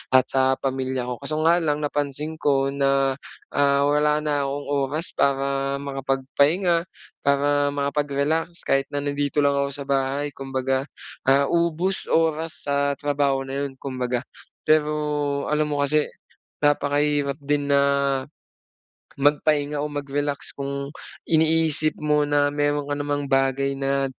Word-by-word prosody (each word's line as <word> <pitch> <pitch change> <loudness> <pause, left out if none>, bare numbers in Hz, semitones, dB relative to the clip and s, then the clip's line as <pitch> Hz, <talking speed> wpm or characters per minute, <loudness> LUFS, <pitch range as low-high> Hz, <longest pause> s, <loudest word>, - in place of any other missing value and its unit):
at 130 - +7
sa 130 0 +3
pamilya 130 -1 -2
ko. 125 - -2
Kaso 155 +2 -3
nga 170 +2 +5
lang 150 -2 -1
napansin 145 +2 -3
ko 135 -1 +2
na, 135 -1 +2 0.4
ah, 140 0 +3
wala 150 +1 +3
na 145 -2 0
akong 140 +1 -4
oras 145 +3 -1
para 135 0 +1
makapagpahinga, 140 +6 +1 0.4
para 145 0 +2
makapag-relax 145 +4 -1
kahit 135 0 +2
na 145 - -1
nandito 145 0 0
lang 140 - +4
ako 140 0 +1
sa 145 - -6
bahay. 140 +1 0
Kumbaga, 135 0 -2 0.4
ah, 140 +1 +4
ubos-oras 165 -2 0
sa 140 0 +1
trabaho 140 -2 0
na 135 +1 -3
'yon, 135 - -7
kumbaga. 125 -2 -2 0.4
Pero 150 -1 +3 0.6
alam 150 0 +2
mo 145 -1 -1
kasi, 150 +1 +2 0.6
napakahirap 145 -1 +2
din 145 0 -1
na 140 - +5 1.4
magpahinga 145 0 +2
o 150 - -2
mag-relax 145 0 -3
kung 140 0 -4 0.3
iniisip 160 -1 +2
mo 150 -1 +2
na 145 0 +2
meron 145 0 0
ka 145 - -1
namang 145 0 -2
bagay 135 0 +1
na, 135 0 0
145 Hz, 130 wpm, -23 LUFS, 135-150 Hz, 1.4 s, at